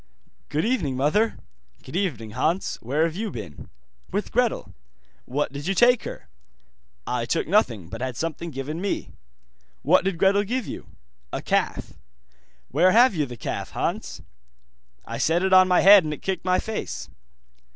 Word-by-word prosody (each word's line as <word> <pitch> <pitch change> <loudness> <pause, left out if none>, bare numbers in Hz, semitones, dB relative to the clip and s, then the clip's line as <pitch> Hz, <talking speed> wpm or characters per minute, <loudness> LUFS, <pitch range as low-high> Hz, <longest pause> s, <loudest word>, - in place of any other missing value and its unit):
'Good 155 +5 0
evening, 175 - 0
mother.' 205 +12 +1 0.5
'Good 130 - -10
evening, 135 - -2
Hans. 160 - -1
Where 140 +7 0
have 165 -1 -1
you 215 +3 -3
been?' 105 - -9 0.4
'With - - -3
Gretel.' - - 0 0.5
'What 145 +2 -2
did 145 +2 -6
you 195 - 0
take 245 +3 +4
her?' - - -8 0.8
'I 120 -1 -2
took 165 - 0
nothing, 120 - +1
but 115 +7 -8
had 130 -2 -3
something 165 +1 -3
given 150 +3 -5
me.' 200 - -3 0.7
'What 175 +6 +4
did 190 -2 -1
Gretel 200 +3 +3
give 245 +3 -2
you?' - - -8 0.4
'A - - -4
calf.' - - -1 0.8
'Where 175 +7 +4
have 240 +1 +6
you 150 -5 -1
the 120 -1 -9
calf, - - -5
Hans?' - - -3 0.8
'I - - -6
set 170 +3 +2
it 190 0 +2
on 185 0 +7
my 180 -1 +4
head 200 -1 +8
and 155 - -3
it - - -20
kicked 190 -2 -3
my 185 0 +3
face. 220 +2 -4
170 Hz, 165 wpm, -24 LUFS, 135-195 Hz, 0.8 s, head